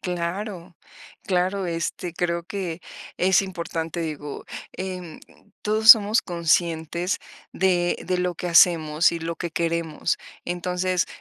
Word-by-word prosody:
Claro, 180 0 -4 0.5
claro, 185 +1 0
este, 170 +1 -3
creo 170 -1 -1
que 180 -3 -5 0.4
es 190 +1 +4
importante, 170 -2 -4
digo, 150 -3 -5 0.3
em, 180 -3 -6 0.4
todos 220 +1 +6
somos 215 -1 +7
conscientes 170 0 0 0.3
de 175 -2 +1
de 185 0 +1
lo 180 -2 -1
que 180 - -4
hacemos, 165 -2 +5
y 170 - -3
lo 165 +1 -4
que 170 - -5
queremos. 165 -1 -1 0.3
Entonces, 180 +1 -1
175 Hz, 120 wpm, -24 LUFS, 170-185 Hz, 0.5 s, somos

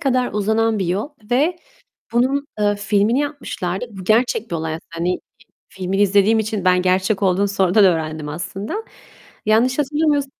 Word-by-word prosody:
kadar 255 -2 +1
uzanan 220 +1 +1
bir 190 - -1
yol 195 +8 -1 0.2
ve 300 +8 +2 0.6
bunun, 270 +4 +1
eee, 205 0 +2
filmini 205 +5 +1
yapmışlardı. 245 -10 -3
Bu 195 -3 -9
gerçek 225 +2 +1
bir 170 - -1
olay 160 0 -3
aslında. 165 - -10
Hani, 170 +2 -2 0.5
filmini 190 +2 -1
izlediğim 205 +3 +4
için 215 -3 -2
ben 180 0 +4
gerçek 190 +2 +1
olduğunu 195 +1 +2
sonradan 195 +1 +3
öğrendim 155 -4 0
aslında. 195 - -5 0.6
Yanlış 240 +6 +3
hatırlamıyors 295 0 +1
205 Hz, 150 wpm, -20 LUFS, 185-245 Hz, 0.6 s, izlediğim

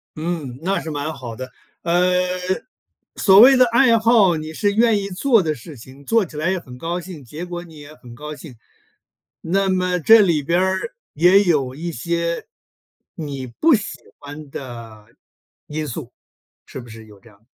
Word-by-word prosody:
嗯， 155 -6 -4
那 195 +3 0
是 160 - -6
蛮 150 +1 -3
好 125 -5 -8
的。 130 +2 -8 0.3
呃， 175 +2 +2 1.0
所 195 -1 +6
谓 265 +4 +9
的 255 - +6
爱 235 0 +4
好， 220 -6 +4
你 155 0 -6
是 200 +5 0
愿 225 -1 +3
意 195 - -4
做 225 +4 +2
的 155 -3 -2
事 140 +4 -12
情， 130 +4 -14
做 225 +7 +2
起 155 - -14
来 155 +5 -1
也 190 - -1
很 125 -7 -12
高 170 +6 -3
兴， 170 -5 -10
结 150 +8 -8
果 175 -1 -6
你 165 -3 -15
也 145 +1 -12
很 125 -5 -14
高 150 +4 -8
兴。 145 -4 -12 0.9
那 195 +3 0
么 180 -1 0
这 225 +8 +7
里 165 -7 +2
边 170 +5 +1
儿， 190 - -1 0.2
也 180 +6 +5
有 140 -8 0
一 170 +3 -5
些 170 +5 -2 0.7
你 140 -7 -6
不 310 - +2
喜 210 -3 -5 0.2
欢 145 0 -10
的 115 -6 -9 0.6
因 155 0 -4
素， 125 -1 -7 0.5
是 - - -9
不 120 - -14
是 110 0 -11
有 105 -2 -17
这 115 - -19
样 100 - -23
的？ 110 - -35
165 Hz, 200 characters per minute, -20 LUFS, 135-190 Hz, 1.0 s, 谓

